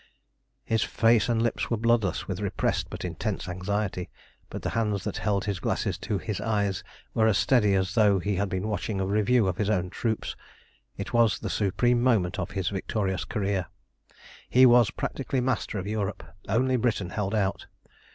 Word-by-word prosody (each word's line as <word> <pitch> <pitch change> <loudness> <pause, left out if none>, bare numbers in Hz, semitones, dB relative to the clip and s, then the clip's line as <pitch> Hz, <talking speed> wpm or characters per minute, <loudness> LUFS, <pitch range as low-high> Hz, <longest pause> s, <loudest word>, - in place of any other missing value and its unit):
His 110 0 +1
face 115 -1 +3
and 115 -1 +2
lips 120 - -1
were 115 - +1
bloodless 115 -5 +1
with 95 -1 -3
repressed 100 -2 -1
but - - -6
intense - - -3
anxiety, 95 0 -2 0.4
but - - -7
the - - -1
hands 105 -4 0
that 105 -1 -3
held 100 -2 0
his 100 -3 -2
glasses - - -1
to 105 - -2
his 105 0 -4
eyes 100 -3 0 0.3
were 110 -1 +3
as 105 -3 +3
steady 105 -7 +3
as 95 0 0
though 105 -3 +4
he 100 +1 -1
had 100 +1 0
been 95 +3 -2
watching 105 -1 -2
a 95 - 0
review 105 +4 +2
of 90 -1 -1
his 105 -1 0
own 90 -4 0
troops. 110 -2 -2 0.6
It - - -6
was 115 -3 +4
the - - -4
supreme 120 +4 +2
moment 110 -8 +2
of - - -3
his 95 -2 -2
victorious 95 0 -2
career. 100 -3 -1 0.8
He 130 +1 +6
was 120 -3 +6
practically 135 -1 -3
master 125 -4 -1
of 95 - -4
Europe. 105 -1 -3 0.3
Only 130 +5 +2
Britain 110 -7 0
held 105 0 -2
out. 100 -2 -1
105 Hz, 180 wpm, -27 LUFS, 95-115 Hz, 0.8 s, He